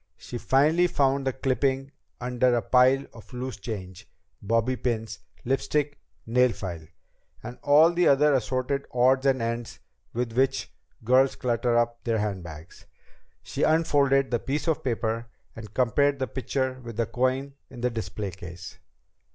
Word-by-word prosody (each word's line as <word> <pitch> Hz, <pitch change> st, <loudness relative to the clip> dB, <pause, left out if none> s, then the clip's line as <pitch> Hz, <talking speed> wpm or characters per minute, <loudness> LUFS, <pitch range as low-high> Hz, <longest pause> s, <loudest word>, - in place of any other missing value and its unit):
She 120 Hz, -, -7 dB
finally 155 Hz, +9 st, +3 dB
found 140 Hz, -5 st, +1 dB
the -, -, +2 dB
clipping 135 Hz, +1 st, 0 dB, 0.3 s
under 125 Hz, 0 st, +1 dB
a 120 Hz, -, +1 dB
pile 130 Hz, +4 st, +4 dB
of 115 Hz, -, -14 dB
loose 125 Hz, +1 st, -5 dB
change, 95 Hz, -4 st, -7 dB, 0.3 s
bobby 115 Hz, +4 st, +1 dB
pins, 110 Hz, -5 st, -3 dB, 0.3 s
lipstick, 145 Hz, +3 st, -1 dB, 0.3 s
nail 125 Hz, +1 st, +3 dB
file 85 Hz, -5 st, -7 dB, 0.6 s
and 120 Hz, +1 st, -8 dB
all 155 Hz, +4 st, +6 dB
the 175 Hz, 0 st, +3 dB
other 145 Hz, +1 st, +5 dB
assorted 130 Hz, +2 st, -1 dB
odds 130 Hz, +2 st, +3 dB
and 130 Hz, -3 st, +2 dB
ends 115 Hz, 0 st, -4 dB, 0.3 s
with 120 Hz, -1 st, -3 dB
which 130 Hz, +2 st, 0 dB, 0.3 s
girls 130 Hz, +3 st, +4 dB
clutter 120 Hz, -1 st, 0 dB
up 120 Hz, 0 st, 0 dB
their 115 Hz, -2 st, 0 dB
handbags. 90 Hz, -6 st, -6 dB, 0.6 s
She -, -, -5 dB
unfolded 140 Hz, -4 st, +3 dB
the 120 Hz, -, +1 dB
piece 145 Hz, +7 st, -3 dB
of 160 Hz, -, 0 dB
paper 115 Hz, -2 st, -2 dB, 0.3 s
and 110 Hz, -3 st, -9 dB
compared 140 Hz, +4 st, +2 dB
the 130 Hz, -, -1 dB
picture 130 Hz, +1 st, -3 dB
with 115 Hz, -2 st, -8 dB
the 115 Hz, -, +1 dB
coin 130 Hz, +4 st, -1 dB, 0.2 s
in 120 Hz, -, -10 dB
the 125 Hz, 0 st, +1 dB
display 105 Hz, -3 st, -4 dB
case. 90 Hz, -1 st, -10 dB
125 Hz, 150 wpm, -26 LUFS, 115-135 Hz, 0.6 s, all